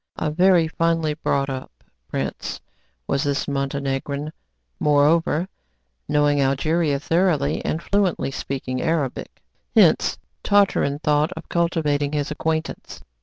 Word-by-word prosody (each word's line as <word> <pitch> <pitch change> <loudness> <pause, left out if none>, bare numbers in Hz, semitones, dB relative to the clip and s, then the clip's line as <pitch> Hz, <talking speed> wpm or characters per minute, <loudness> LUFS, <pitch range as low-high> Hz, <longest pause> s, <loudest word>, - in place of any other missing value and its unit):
A 150 - -2
very 175 0 +4
finely 165 -1 0
brought 140 -2 -1
up 130 - -7 0.2
prince - - -4 0.5
was 140 - 0
this 145 -2 -1
Montenegrin; 140 +1 -2 0.5
moreover, 150 +3 +3 0.6
knowing 145 -1 +3
Algeria 145 +2 +1
thoroughly, 160 -2 +1
and 160 +2 -2
fluently 195 -8 0
speaking 130 -1 -4
Arabic. 155 -6 -2 0.3
Hence - - +4 0.3
Tartarin 195 -8 +3
thought 150 +2 +2
of 160 - -10
cultivating 150 -4 0
his 150 0 -1
acquaintance. 160 +1 -3
150 Hz, 110 wpm, -22 LUFS, 140-165 Hz, 0.6 s, very